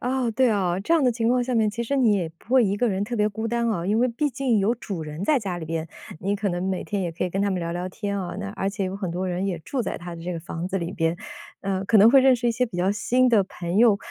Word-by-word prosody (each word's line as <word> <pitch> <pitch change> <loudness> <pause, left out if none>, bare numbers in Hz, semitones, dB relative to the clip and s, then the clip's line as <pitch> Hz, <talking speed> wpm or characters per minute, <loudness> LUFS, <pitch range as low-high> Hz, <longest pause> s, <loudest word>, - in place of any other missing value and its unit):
哦， 250 -1 0
对 255 +1 +3
啊， 185 -4 +1
这 330 - -1
样 325 -4 +4
的 250 - +4
情 230 0 0
况 250 0 +3
下 250 0 -2
面 220 -2 +3
其 235 +3 -4
实 275 +4 -1
你 235 -5 +4
也 180 -5 0
不 240 - -10
会 255 -3 +6
一 200 +1 0
个 245 +2 +1
人 195 0 -1
特 240 +3 -5
别 210 0 +2
孤 220 +2 -4
单 235 0 0
啊。 175 -4 -2
因 215 +3 +2
为 250 +1 +3
毕 290 +6 -1
竟 250 -3 0
有 210 +5 +2
主 195 -8 -6
人 155 +5 -5
在 295 +1 +3
家 185 -5 -4
里 160 - -6
边， 165 0 -3 0.3
你 200 +3 0
可 200 0 -1
能 175 0 -2
每 185 - -2
天 205 -2 -2
也 170 - -2
可 180 - -2
以 180 - -2
跟 195 - -1
他 200 - +1
们 185 - -1
聊 170 0 -3
聊 180 +1 -3
天 200 +1 -3
啊， 175 -1 -5
那 200 -1 -4
而 195 -1 -2
且 200 -1 -3
有 190 +1 -3
很 190 -4 -3
多 185 +2 -2
人 180 +2 -1
也 180 -4 -2
住 260 - -3
在 - - -3
他 175 -1 -7
的 165 - -9
这 180 +1 -3
个 165 - -5
房 170 +1 -5
子 195 - -2
里 170 0 -3
边， 165 -2 0 0.5
呃， 195 -1 -1
可 220 - +3
能 220 +4 +8
会 270 0 +7
认 260 -1 +6
识 240 0 -2
一 - - +3
些 245 +2 0
比 185 - -8
较 185 +2 +2
新 250 +5 +2
的 220 -5 +5
朋 180 0 -3
友， 225 -3 +6
200 Hz, 350 characters per minute, -24 LUFS, 180-235 Hz, 0.5 s, 能